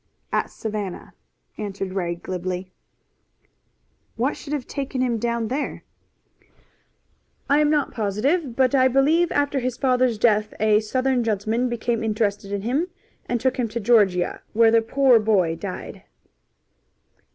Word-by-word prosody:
"At -, -, 0 dB
Savannah," 210 Hz, -4 st, -5 dB, 0.5 s
answered 195 Hz, -2 st, -4 dB
Ray 175 Hz, -3 st, -2 dB
glibly. 185 Hz, +1 st, -5 dB, 1.4 s
"What 255 Hz, +6 st, 0 dB
should 290 Hz, -, -9 dB
have 290 Hz, -4 st, -2 dB
taken 275 Hz, -2 st, -4 dB
him 245 Hz, -3 st, 0 dB
down 235 Hz, 0 st, -1 dB
there?" 285 Hz, +3 st, -3 dB, 1.6 s
"I 285 Hz, +1 st, +4 dB
am 300 Hz, -1 st, +3 dB
not 295 Hz, -2 st, +1 dB
positive, 235 Hz, -, 0 dB
but 260 Hz, 0 st, +2 dB
I 260 Hz, -1 st, +5 dB
believe 295 Hz, +7 st, +3 dB
after 285 Hz, -1 st, +1 dB
his 250 Hz, -1 st, -3 dB
father's 255 Hz, -3 st, +2 dB
death 215 Hz, -1 st, +2 dB
a 210 Hz, 0 st, +4 dB
Southern 255 Hz, +3 st, 0 dB
gentleman 225 Hz, +3 st, 0 dB
became 235 Hz, -1 st, -1 dB
interested 210 Hz, -2 st, -1 dB
in 200 Hz, -1 st, -3 dB
him 275 Hz, +10 st, 0 dB, 0.4 s
and 240 Hz, -, -1 dB
took 260 Hz, +2 st, 0 dB
him 245 Hz, -2 st, 0 dB
to 220 Hz, +2 st, -4 dB
Georgia, 200 Hz, -6 st, +2 dB
where 225 Hz, 0 st, +5 dB
the 230 Hz, 0 st, +5 dB
poor 255 Hz, +1 st, +4 dB
boy 195 Hz, -7 st, +2 dB
died." 185 Hz, +2 st, -7 dB
230 Hz, 140 wpm, -23 LUFS, 210-260 Hz, 1.6 s, I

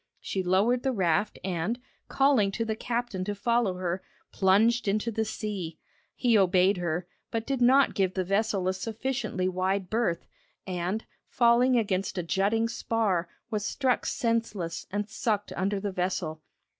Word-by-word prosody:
She 190 Hz, -, -2 dB
lowered 200 Hz, +7 st, +2 dB
the 265 Hz, -, 0 dB
raft 200 Hz, -1 st, +1 dB
and, 185 Hz, +6 st, -2 dB, 0.3 s
calling 270 Hz, -7 st, +3 dB
to 230 Hz, -, -1 dB
the 220 Hz, -1 st, -1 dB
captain 235 Hz, -5 st, -2 dB
to 205 Hz, +1 st, -2 dB
follow 235 Hz, -2 st, +1 dB
her, 180 Hz, 0 st, -2 dB, 0.3 s
plunged 215 Hz, +5 st, +3 dB
into 215 Hz, +3 st, 0 dB
the 220 Hz, 0 st, 0 dB
sea. 200 Hz, -6 st, -4 dB, 0.4 s
He 240 Hz, -3 st, +2 dB
obeyed 190 Hz, +1 st, +4 dB
her, 175 Hz, 0 st, -2 dB, 0.2 s
but 225 Hz, 0 st, -2 dB
did 270 Hz, -1 st, -2 dB
not 265 Hz, +3 st, +5 dB
give 190 Hz, -2 st, 0 dB
the 185 Hz, -, +1 dB
vessel 195 Hz, 0 st, 0 dB
a 185 Hz, -, +2 dB
sufficiently 225 Hz, -1 st, -2 dB
wide 185 Hz, +1 st, -1 dB
berth, 215 Hz, -7 st, 0 dB, 0.4 s
and, 185 Hz, +3 st, -2 dB, 0.2 s
falling 245 Hz, +1 st, +4 dB
against 195 Hz, -3 st, -1 dB
a 180 Hz, -, -1 dB
jutting 200 Hz, +6 st, +1 dB
spar, 215 Hz, -7 st, 0 dB, 0.2 s
was 210 Hz, -2 st, -1 dB
struck 255 Hz, +4 st, 0 dB
senseless 225 Hz, -8 st, -1 dB
and 205 Hz, +1 st, -2 dB
sucked 215 Hz, -1 st, -2 dB
under 195 Hz, +1 st, 0 dB
the 200 Hz, 0 st, -3 dB
vessel. 180 Hz, -4 st, -2 dB
205 Hz, 155 wpm, -28 LUFS, 185-230 Hz, 0.4 s, not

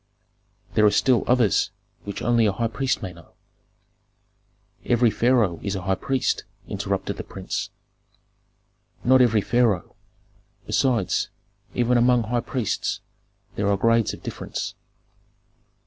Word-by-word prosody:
There 105 Hz, -, +3 dB
are 105 Hz, -, +7 dB
still 125 Hz, +3 st, +3 dB
others 120 Hz, -6 st, +3 dB, 0.4 s
which 100 Hz, -1 st, -5 dB
only 120 Hz, -1 st, +3 dB
a -, -, +2 dB
high 115 Hz, +4 st, -1 dB
priest 125 Hz, +3 st, -1 dB
may 95 Hz, -2 st, -5 dB
know." 85 Hz, -1 st, -17 dB, 1.5 s
"Every 120 Hz, -1 st, +3 dB
pharaoh 110 Hz, -6 st, +2 dB
is 100 Hz, -1 st, -2 dB
a 95 Hz, -, -4 dB
high 95 Hz, +1 st, +1 dB
priest," 130 Hz, +7 st, -1 dB, 0.2 s
interrupted -, -, -3 dB
the -, -, -5 dB
prince. -, -, -5 dB, 1.3 s
"Not 130 Hz, +1 st, +5 dB
every 115 Hz, -4 st, +4 dB
pharaoh. 115 Hz, -4 st, +1 dB, 0.7 s
Besides, 120 Hz, -8 st, +1 dB, 0.5 s
even 120 Hz, 0 st, +3 dB
among 120 Hz, 0 st, +4 dB
high 120 Hz, +2 st, -1 dB
priests 120 Hz, -3 st, -2 dB, 0.6 s
there 100 Hz, 0 st, 0 dB
are 100 Hz, -, +2 dB
grades 115 Hz, +1 st, +3 dB
of -, -, -10 dB
difference." -, -, -5 dB
115 Hz, 125 wpm, -24 LUFS, 100-125 Hz, 1.5 s, are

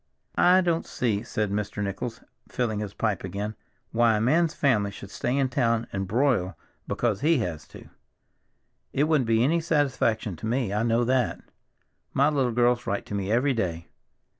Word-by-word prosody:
"I 180 Hz, +1 st, +5 dB
don't 170 Hz, -2 st, 0 dB
see," 110 Hz, -5 st, -1 dB
said 105 Hz, -3 st, -2 dB
Mr. 105 Hz, 0 st, -2 dB
Nichols, 105 Hz, +4 st, -4 dB, 0.3 s
filling 110 Hz, -4 st, -1 dB
his 105 Hz, -2 st, -5 dB
pipe 105 Hz, -5 st, -1 dB
again, 100 Hz, +3 st, -4 dB, 0.4 s
"why 115 Hz, -1 st, +3 dB
a -, -, 0 dB
man's 160 Hz, +8 st, +2 dB
family 115 Hz, -8 st, +2 dB
should 100 Hz, -1 st, -10 dB
stay 125 Hz, +3 st, -1 dB
in 135 Hz, -1 st, +2 dB
town 115 Hz, -3 st, +1 dB
and 95 Hz, -1 st, -2 dB
broil 115 Hz, -4 st, +1 dB, 0.3 s
because 110 Hz, -5 st, -1 dB
he 160 Hz, +2 st, +4 dB
has 80 Hz, -4 st, -6 dB
to. -, -, -13 dB, 1.1 s
It 140 Hz, -, +2 dB
wouldn't 150 Hz, -5 st, +2 dB
be 115 Hz, 0 st, +3 dB
any 160 Hz, +6 st, +3 dB
satisfaction 135 Hz, -, 0 dB
to 110 Hz, -, -5 dB
me, 120 Hz, -3 st, 0 dB
I 105 Hz, -, +1 dB
know 115 Hz, +1 st, +2 dB
that. 125 Hz, 0 st, 0 dB, 0.7 s
My 140 Hz, +2 st, +4 dB
little 135 Hz, -5 st, +1 dB
girls 120 Hz, +1 st, +2 dB
write 100 Hz, -, -2 dB
to -, -, -8 dB
me 100 Hz, 0 st, -2 dB
every 130 Hz, +5 st, +2 dB
day." 85 Hz, -7 st, -3 dB
115 Hz, 175 wpm, -26 LUFS, 105-135 Hz, 1.1 s, I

